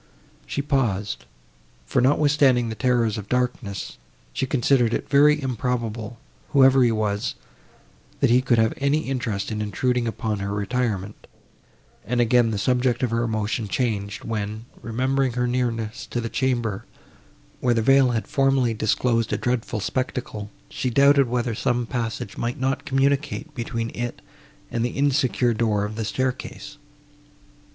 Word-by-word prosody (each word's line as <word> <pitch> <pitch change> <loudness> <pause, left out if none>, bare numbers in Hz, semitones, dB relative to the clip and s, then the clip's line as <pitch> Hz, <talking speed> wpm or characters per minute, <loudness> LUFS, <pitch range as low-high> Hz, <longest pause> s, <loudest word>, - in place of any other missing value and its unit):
She 140 - -2
paused, 115 -8 -1 0.6
for, - - +1
notwithstanding 135 -3 +3
the 110 - -4
terrors 120 -4 +1
of 105 - -9
darkness, 125 -6 -2 0.3
she 135 - -1
considered 125 -3 +2
it - - -1
to - - -23
be - - -27
very 150 +1 +5
improbable, 120 -3 -3 0.4
whoever 135 -1 +6
he 120 -2 +4
was, 110 0 -1 0.8
that - - +3
he 125 +1 +5
could 130 -2 +2
have 110 0 +3
any 140 +3 +1
interest 120 -9 -3
in 105 0 -2
intruding 120 +4 0
upon 110 -2 -2
her 100 0 -3
retirement; 105 -2 -2 0.8
and 125 +1 -1
again 120 0 +4
the 110 - -2
subject 125 +3 +1
of 125 - +1
her 115 0 +1
emotion 110 -1 -1
changed, 105 -4 -2
when, 110 0 -4 0.2
remembering 130 +2 0
her 125 0 0
nearness 120 -2 -2
to 120 - -3
the 115 -1 -3
chamber, 120 -6 -1 0.8
where 120 -2 +2
the 115 - +1
veil 135 +1 +5
had 115 -2 -1
formerly 135 -4 +2
disclosed 115 +2 +1
a - - +1
dreadful 120 -2 -1
spectacle, 120 -2 -3 0.2
she 130 - -2
doubted 140 +2 +5
whether 120 -1 -1
some 120 +2 0
passage 115 -2 -4
might 120 +2 -2
not 135 +3 -1
communicate 140 +2 0
between 115 -2 -4
it 120 0 -4 0.5
and 115 - -1
the 120 - -3
insecure 130 -3 +2
door 110 -2 +1
of 105 +1 -6
the 110 -1 -3
staircase. 130 +6 -4
120 Hz, 150 wpm, -24 LUFS, 110-130 Hz, 0.8 s, whoever